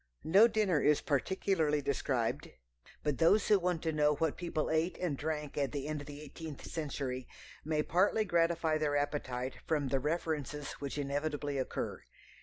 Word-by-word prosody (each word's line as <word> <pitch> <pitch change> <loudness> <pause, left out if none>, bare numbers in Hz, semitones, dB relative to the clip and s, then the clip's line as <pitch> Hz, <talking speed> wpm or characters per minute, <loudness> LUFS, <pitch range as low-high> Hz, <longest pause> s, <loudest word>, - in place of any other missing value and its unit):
No 195 +8 +7
dinner 210 -8 +2
is 150 0 +4
particularly 160 0 +1
described, 130 -4 -1 0.5
but 150 -3 0
those 200 +6 +4
who 205 -2 +6
want 175 -2 -1
to 160 - +1
know 150 0 +3
what 160 0 0
people 170 -4 -2
ate 160 +3 +1
and 175 -6 -1
drank 150 0 -3
at 140 -1 0
the 140 0 -3
end 150 -1 -3
of 145 - -10
the 145 0 -8
eighteenth 150 0 -8
century 135 -5 -4 0.4
may 155 0 0
partly 200 +6 +2
gratify 165 -3 +2
their 145 -2 +1
appetite 130 -3 -2
from 145 -4 +1
the 135 - +2
references 150 -1 -2
which 140 0 -4
inevitably 145 0 -2
occur. 130 - -3
150 Hz, 165 wpm, -33 LUFS, 145-165 Hz, 0.5 s, No